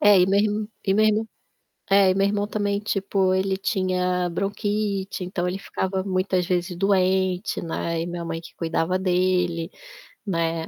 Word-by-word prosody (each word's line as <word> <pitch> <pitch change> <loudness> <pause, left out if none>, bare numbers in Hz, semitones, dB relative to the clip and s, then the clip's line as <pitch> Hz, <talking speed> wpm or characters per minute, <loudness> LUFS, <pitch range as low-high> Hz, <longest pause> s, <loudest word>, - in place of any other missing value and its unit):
É, 205 -1 +7
e 180 - +5
mesmo 205 +2 +1 0.2
e 195 - +3
mesmo 215 +1 +3 0.6
é, 195 -1 +5
e 185 - +2
meu 195 0 +3
irmão 205 0 0
também, 205 -1 -1
tipo, 195 -2 0
ele 190 0 0
tinha 185 -2 0
bronquite, 200 0 -2
então 180 0 -2
ele 185 +2 -3
ficava 190 -1 -2
muitas 185 -2 0
vezes 180 -1 -1
doente, 185 0 +1
né, 165 0 -2
e 170 - -3
minha 175 -1 -5
mãe 165 0 -4
que 165 - -14
cuidava 165 +2 0
dele, 180 -2 +1 0.6
né, 165 -3 -1
190 Hz, 155 wpm, -24 LUFS, 180-200 Hz, 0.6 s, É